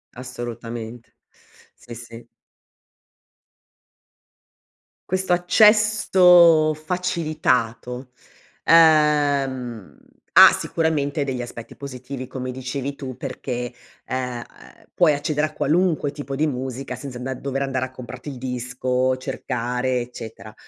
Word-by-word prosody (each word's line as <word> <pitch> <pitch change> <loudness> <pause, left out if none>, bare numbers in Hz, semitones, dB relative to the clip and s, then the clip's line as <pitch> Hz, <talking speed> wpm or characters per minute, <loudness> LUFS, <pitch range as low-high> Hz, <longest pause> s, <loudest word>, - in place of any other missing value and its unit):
Assolutamente, 120 -2 -7 0.6
sì, 120 - -12
sì. 115 0 -11 2.8
Questo 185 -1 +1
accesso 180 -4 +5
facilitato, 150 -8 -2 0.5
ehm, 145 - +3 0.4
ha - - +10
sicuramente 150 -3 -1
degli 130 -2 -3
aspetti 120 -1 -9
positivi 130 -1 -7
come 130 0 -5
dicevi 130 +2 -5
tu 130 -3 -7
perché, 125 -2 -5 0.3
ehm, 125 -2 -3 0.5
puoi 165 -4 +4
accedere 150 +1 -1
a 155 - -14
qualunque 160 -2 +1
tipo 140 -2 -6
di 155 +1 +2
musica 130 0 -4
senza 135 -3 -8
anda 130 +2 -4
dover 135 +1 -4
andare 130 -1 -1
a 130 - -11
comprarti 130 +3 -9
il 135 - -7
disco, 125 +1 -1
cercare, 125 0 -2
eccetera. 110 -4 -9
130 Hz, 100 wpm, -22 LUFS, 125-155 Hz, 2.8 s, ha